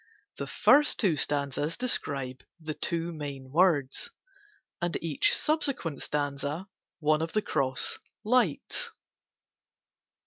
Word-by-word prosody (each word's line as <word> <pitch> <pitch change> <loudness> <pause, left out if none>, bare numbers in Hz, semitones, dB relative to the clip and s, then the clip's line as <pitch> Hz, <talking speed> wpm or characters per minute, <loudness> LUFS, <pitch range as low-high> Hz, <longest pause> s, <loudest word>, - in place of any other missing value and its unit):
The - - -4
first 295 +1 +4
two 190 -8 +3
stanzas 145 +2 0
describe 135 - -1 0.2
the 155 -1 -4
two 170 +1 -2
main 140 -4 -7
words, 155 -5 +2 0.7
and 175 0 0
each 160 -4 +3
subsequent 275 - 0
stanza 145 +3 -2 0.3
one 155 -1 +2
of 165 0 -3
the 215 - +2
cross 130 -1 0 0.2
"lights." 255 - +1
155 Hz, 105 wpm, -29 LUFS, 140-185 Hz, 0.7 s, first